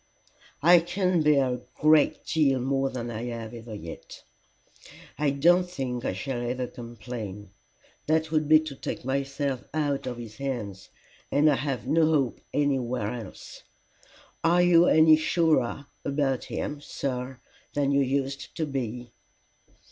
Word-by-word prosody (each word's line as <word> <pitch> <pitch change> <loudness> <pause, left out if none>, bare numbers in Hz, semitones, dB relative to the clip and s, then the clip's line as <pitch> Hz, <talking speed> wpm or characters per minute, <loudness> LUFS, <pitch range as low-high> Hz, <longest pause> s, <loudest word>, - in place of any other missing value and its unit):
"I 175 +2 +8
can 180 0 0
bear 145 -3 +4
a 125 - -5
great 155 0 +3
deal 140 -5 +2
more 135 +1 0
than 120 -2 -5
I 115 +1 -4
have 115 -2 -5
had 115 -1 -10 0.2
yet. 85 - -10 1.0
I 150 -1 +2
don't 175 +6 +3
think 130 -7 -4
I - - 0
shall 120 +6 -4
ever 125 +1 -2
complain. 115 -5 -8 0.6
That 160 0 +1
would 155 -2 +1
be 155 0 +7
to 155 -3 -7
take 130 - -6
myself 135 0 -2
out 145 -4 -1
of 125 -2 -4
his 110 -3 -9
hands, 115 -8 -5 0.4
and 145 +2 +4
I 150 - +5
have 135 -2 -3
no 160 0 +3
hope 145 -6 +1
anywhere 125 -7 0
else. 115 -6 -9 0.8
Are 175 +2 +4
you 175 -1 +6
any 155 0 +6
surer 155 -5 +1 0.2
about 140 -2 0
him, 145 -1 -4
sir, 130 -3 -4 0.4
than 140 -1 +1
you 140 0 +3
used 135 +1 -2
to 160 - -1
be?" 125 -4 -5
135 Hz, 145 wpm, -27 LUFS, 120-155 Hz, 1.0 s, I